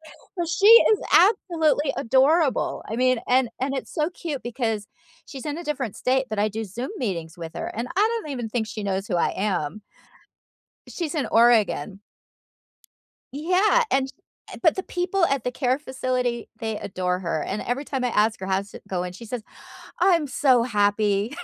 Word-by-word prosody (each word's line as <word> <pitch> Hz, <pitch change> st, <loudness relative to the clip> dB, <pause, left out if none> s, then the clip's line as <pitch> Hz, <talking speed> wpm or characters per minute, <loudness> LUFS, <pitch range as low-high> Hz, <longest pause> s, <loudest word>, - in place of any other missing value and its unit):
uh, 345 Hz, -3 st, -6 dB
she 340 Hz, +5 st, +1 dB, 0.3 s
is 425 Hz, -, +1 dB
absolutely 325 Hz, -7 st, +3 dB
adorable. 270 Hz, +4 st, +2 dB
I 225 Hz, -, -3 dB
mean, 255 Hz, -1 st, +2 dB
and 255 Hz, 0 st, +3 dB
and 270 Hz, +1 st, -1 dB
it's 265 Hz, -, -6 dB
so 310 Hz, -2 st, +1 dB
cute 320 Hz, -6 st, -5 dB
because 230 Hz, -4 st, -2 dB, 0.4 s
she's 270 Hz, -4 st, -9 dB
in 295 Hz, +2 st, -3 dB
a 345 Hz, -, -7 dB
different 265 Hz, -8 st, -3 dB
state, 260 Hz, +1 st, +1 dB
but 215 Hz, -, -3 dB
I 210 Hz, -, +2 dB
do 220 Hz, +2 st, -4 dB
Zoom 230 Hz, +6 st, -6 dB
meetings 175 Hz, -, -4 dB
with 165 Hz, -1 st, -7 dB
her, -, -, -4 dB
and 235 Hz, +3 st, -3 dB
I -, -, +3 dB, 0.2 s
don't 305 Hz, -, -8 dB
even 245 Hz, -5 st, -4 dB
think 220 Hz, 0 st, -2 dB
she 215 Hz, 0 st, -6 dB
knows 195 Hz, 0 st, -2 dB
who 180 Hz, -, -1 dB
I 170 Hz, -, +1 dB
am. 190 Hz, -1 st, -2 dB, 1.1 s
She's 335 Hz, -2 st, -4 dB
in 295 Hz, -, -1 dB
Oregon. 220 Hz, -6 st, +3 dB, 1.3 s
Yeah, 365 Hz, -, +3 dB
and 265 Hz, 0 st, +1 dB, 0.4 s
uh -, -, -8 dB
but 325 Hz, -4 st, +4 dB
the 380 Hz, -, -3 dB
people 360 Hz, 0 st, 0 dB
at 275 Hz, -3 st, -1 dB
the 250 Hz, -, 0 dB
care 255 Hz, +1 st, 0 dB
facility, 255 Hz, -4 st, -2 dB
they 220 Hz, -2 st, -3 dB
adore 180 Hz, -2 st, -2 dB
her, 165 Hz, -4 st, -2 dB
and 200 Hz, -, -3 dB
every 265 Hz, +4 st, -3 dB
time 265 Hz, -3 st, -3 dB
I 250 Hz, -, +1 dB
ask 220 Hz, 0 st, +1 dB
her 190 Hz, -, -3 dB
how's 195 Hz, +1 st, -2 dB
it -, -, -11 dB
going, 180 Hz, -1 st, -3 dB
she 230 Hz, +6 st, -10 dB
says, 235 Hz, +1 st, -5 dB, 0.6 s
"I'm 345 Hz, -4 st, +3 dB
so 255 Hz, -3 st, +3 dB
happy." 205 Hz, +1 st, +1 dB
245 Hz, 180 wpm, -24 LUFS, 210-290 Hz, 1.3 s, but